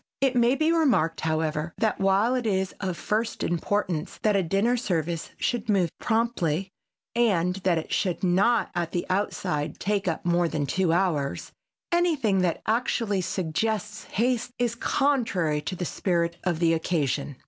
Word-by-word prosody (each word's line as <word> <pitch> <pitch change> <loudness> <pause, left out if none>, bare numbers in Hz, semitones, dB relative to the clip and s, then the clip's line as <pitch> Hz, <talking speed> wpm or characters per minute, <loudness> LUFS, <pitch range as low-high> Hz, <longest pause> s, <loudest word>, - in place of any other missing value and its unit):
It 265 -2 +2
may 240 +2 +4
be 315 +3 +2
remarked, 250 - +2
however, 155 0 -1
that 220 -3 0
while 195 +5 +3
it 250 -3 -1
is 190 -2 0
of 185 -3 -3
first 220 +2 -1
importance 175 -2 -1
that 210 -2 +3
a 195 - +3
dinner 195 +8 +1
service 170 -7 -2
should 240 -3 -2
move 185 -6 +2
promptly 195 -7 0 0.4
and 190 -7 +2
that 185 -3 +1
it 160 - -4
should 185 -3 -1
not 200 +6 +3
at 175 -2 -2
the 175 - -1
outside 185 -5 -1
take 200 -1 -1
up 165 -1 -2
more 175 0 +2
than 150 -3 -2
two 175 +5 +1
hours, 165 -6 0 0.4
anything 310 - +2
that 175 -2 0
actually 225 -3 0
suggests 210 +5 -2
haste 240 +2 0
is 240 -2 0
contrary 225 - +1
to 185 +5 -4
the 180 - -3
spirit 170 -1 0
of 175 -3 +1
the 165 0 +3
occasion. 150 -4 -1
190 Hz, 160 wpm, -26 LUFS, 170-225 Hz, 0.4 s, may